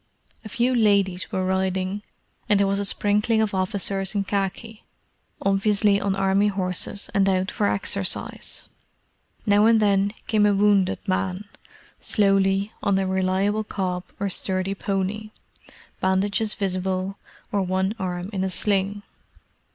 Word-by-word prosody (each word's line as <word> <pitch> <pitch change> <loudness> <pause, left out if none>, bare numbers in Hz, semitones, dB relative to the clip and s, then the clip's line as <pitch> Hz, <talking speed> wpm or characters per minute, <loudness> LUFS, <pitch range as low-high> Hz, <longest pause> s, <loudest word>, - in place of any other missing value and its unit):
A 215 - -8
few 245 +5 +1
ladies 200 -5 +2
were 185 0 -1
riding, 190 +1 -1 0.5
and 205 -1 +4
there 200 - +4
was 195 0 0
a 200 - -1
sprinkling 210 +3 +1
of 220 -2 +1
officers 195 +1 -1
in 200 - +1
khaki; 200 +3 -3 0.6
obviously 200 +1 +2
on 195 -1 0
Army 195 +1 +2
horses 190 0 -2
and 195 -1 +3
out 185 0 0
for 205 - 0
exercise. 195 -1 -2 0.8
Now 205 +1 +5
and 225 -1 +5
then 200 -1 +2
came 210 -2 +3
a 205 - +3
wounded 200 -1 +2
man, 190 0 -1 0.6
slowly, 195 0 +2
on 200 -2 +2
a 195 - +1
reliable 190 +3 +1
cob 185 -3 -3
or 200 - 0
sturdy 185 +1 -1
pony—bandages 200 0 -3
visible, 190 0 -2 0.3
or 205 - +1
one 190 +2 0
arm 180 +1 -3
in 190 -1 -1
a 190 - 0
sling. 200 +2 0
195 Hz, 135 wpm, -24 LUFS, 190-205 Hz, 0.8 s, Now